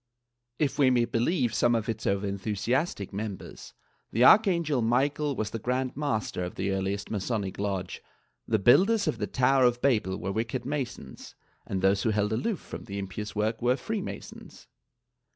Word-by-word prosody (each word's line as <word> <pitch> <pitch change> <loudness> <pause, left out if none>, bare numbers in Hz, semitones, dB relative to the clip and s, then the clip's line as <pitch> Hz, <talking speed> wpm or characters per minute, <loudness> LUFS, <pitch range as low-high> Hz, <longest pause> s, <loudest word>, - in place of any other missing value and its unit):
If 150 -1 -1
we 135 -2 +6
may 120 -2 +3
believe 120 - 0
some 120 0 +3
of 110 -2 -1
its 110 -1 -3
over 100 +1 0
enthu 100 +2 -3
siastic 115 - -1
members, 100 -1 -7 0.4
the 115 - +2
Archangel 170 - +5
Michael 140 +5 +1
was 110 -2 -3
the 115 - -4
Grand 125 +3 -1
Master 110 -10 -2
of 90 - -5
the 95 +1 -1
earliest 95 +1 -2
Masonic 100 -2 -2
lodge; 95 -3 -3 0.5
the 110 - +2
builders 195 - +4
of 115 - -1
the 105 - -1
Tower 130 +1 +3
of 120 0 +2
Babel 110 -8 +1
were 95 - -3
wicked 115 +4 -3
Masons 130 - -5 0.3
and 95 -1 -3
those 95 +1 +3
who 115 - +1
held 105 0 +1
aloof 195 - -1
from - - -9
the 100 - -6
impious 100 +2 -5
work 110 +2 -1
were 125 +2 +2
Free 220 +4 -3
Masons. - - -9
115 Hz, 175 wpm, -28 LUFS, 100-130 Hz, 0.5 s, we